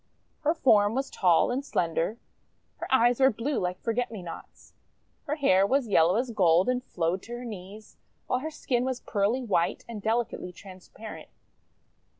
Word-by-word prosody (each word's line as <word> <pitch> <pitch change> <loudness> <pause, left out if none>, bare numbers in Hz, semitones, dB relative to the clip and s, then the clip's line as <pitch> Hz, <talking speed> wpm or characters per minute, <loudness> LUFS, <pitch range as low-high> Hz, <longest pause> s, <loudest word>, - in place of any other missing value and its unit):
Her 310 +2 +1
form 215 -7 +4
was 270 +1 -2
tall 180 +3 +3
and 260 +3 -2
slender. 170 - -1 0.6
Her - - -6
eyes 245 -1 +4
were 265 0 +6
blue 255 +5 -2
like 180 0 -2
Forget 240 +1 -1
Me 215 -5 -8
Nots, 170 - -11 0.5
her 295 - 0
hair 195 - +3
was 265 0 +1
yellow 175 -2 +4
as 240 +2 -1
gold 180 -4 +3
and 250 0 0
flowed 175 -3 -2
to 235 - -9
her 240 +1 -6
knees, 210 0 -10 0.3
while 250 - 0
her 310 +4 -4
skin 250 -5 -1
was 255 -1 -3
pearly 215 +5 0
white 180 -7 0
and 225 -3 -7
delicately 220 -4 -1
transparent. 190 +4 -11
225 Hz, 165 wpm, -27 LUFS, 185-255 Hz, 0.6 s, were